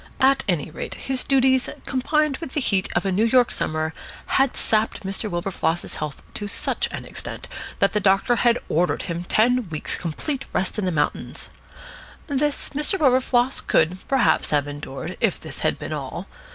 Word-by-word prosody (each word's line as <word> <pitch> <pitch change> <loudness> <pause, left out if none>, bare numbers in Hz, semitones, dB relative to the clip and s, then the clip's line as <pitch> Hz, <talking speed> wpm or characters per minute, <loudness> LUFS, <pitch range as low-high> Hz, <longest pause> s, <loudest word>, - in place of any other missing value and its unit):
At 270 +1 +4
any 160 -4 0
rate, - - -5
his 265 -1 -1
duties, 260 -1 +3 0.2
combined 300 +2 +1
with 325 -6 -7
the - - +1
heat 195 -8 +1
of 175 - +1
a 195 - +1
New 195 +4 +2
York 245 +1 +4
summer, 155 0 -1 0.3
had 270 -1 +2
sapped 220 -1 +1
Mr. 195 +3 -2
Wilberfloss's 175 -1 -2
health 150 -2 -5
to 205 - -4
such - - 0
an - - -6
extent - - -6 0.3
that 195 - +2
the 210 - +2
doctor 195 +4 +3
had 240 0 +4
ordered 175 +3 +1
him 170 -1 -3
ten 240 +1 +2
weeks' 155 -2 -2
complete 260 - -3
rest 190 +3 0
in 200 - -1
the 180 - +1
mountains. 150 -3 -1 0.8
This 290 0 -1
Mr. 300 +7 0
Wilberfloss 255 -2 +3
could, 170 +4 +2
perhaps, 270 -3 +3
have 145 -1 +2
endured, 145 -2 -6
if - - +2
this - - -7
had - - +1
been - - -5
all. - - -5
215 Hz, 175 wpm, -23 LUFS, 175-260 Hz, 0.8 s, At